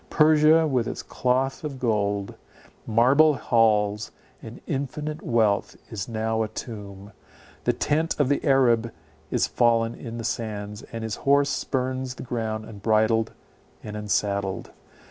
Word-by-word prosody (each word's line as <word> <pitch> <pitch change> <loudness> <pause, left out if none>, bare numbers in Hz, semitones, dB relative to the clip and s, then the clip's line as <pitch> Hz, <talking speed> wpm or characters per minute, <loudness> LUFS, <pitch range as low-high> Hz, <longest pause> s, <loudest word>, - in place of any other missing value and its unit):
Persia, 155 +1 +5
with 130 -6 0
its - - -5
cloth 130 +3 -1
of 145 -3 -5
gold, 100 -4 0 0.5
marble 135 +7 +5
halls, 105 -4 +2 0.3
and - - -10
infinite 150 +3 -4
wealth, 110 -4 +1 0.2
is 110 0 -5
now 110 0 -1
a 110 - 0
tomb. 105 -3 -8 0.5
The - - +3
tent 155 +2 0
of 145 - +3
the 145 - 0
Arab 120 -5 +3 0.4
is - - +1
fallen 115 -1 +2
in 115 -2 -8
the 115 - -5
sands, 105 -3 -4
and 115 -1 -5
his 110 -1 -3
horse 140 0 +3
spurns 130 -1 -2
the - - -8
ground 110 -3 -3
unbridled 110 +1 +1 0.5
and 105 -1 -7
unsaddled. 100 -2 -1
115 Hz, 135 wpm, -25 LUFS, 105-135 Hz, 0.5 s, Persia